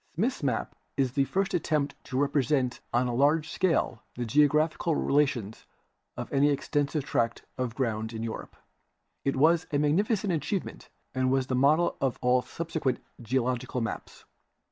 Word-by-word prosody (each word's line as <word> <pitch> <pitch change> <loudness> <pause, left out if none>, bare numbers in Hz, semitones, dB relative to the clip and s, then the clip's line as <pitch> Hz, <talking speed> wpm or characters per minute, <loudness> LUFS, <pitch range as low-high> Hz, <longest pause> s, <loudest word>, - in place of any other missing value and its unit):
Smith's 230 - 0
map 130 -6 -1 0.2
is 135 -2 +2
the 140 +1 +2
first 195 +6 -1
attempt 155 -4 0
to 130 - -4
represent 140 -2 +1
on 120 +1 +2
a 125 - -1
large 150 +5 +2
scale 165 -10 +1
the 120 - -3
geological 150 +5 +3
relations 135 -9 0 0.5
of - - -6
any 140 +1 +4
extensive 145 +1 0
tract 115 -4 -1
of 125 -3 -3
ground 110 -4 -1
in 110 -1 -5
Europe. 115 -1 -6 0.7
I\ - - +1
was 160 +5 +4
a. 145 - +2
magnificent 190 +7 +1
achievement 160 +5 -3 0.2
and 130 -1 +1
was 135 -1 +2
the 130 - -1
model 150 +6 +3
of 135 -2 0
all 125 0 +3
subsequent 160 -3 -2 0.2
geological 125 +1 -1
maps. 115 - -5
140 Hz, 150 wpm, -28 LUFS, 125-155 Hz, 0.7 s, any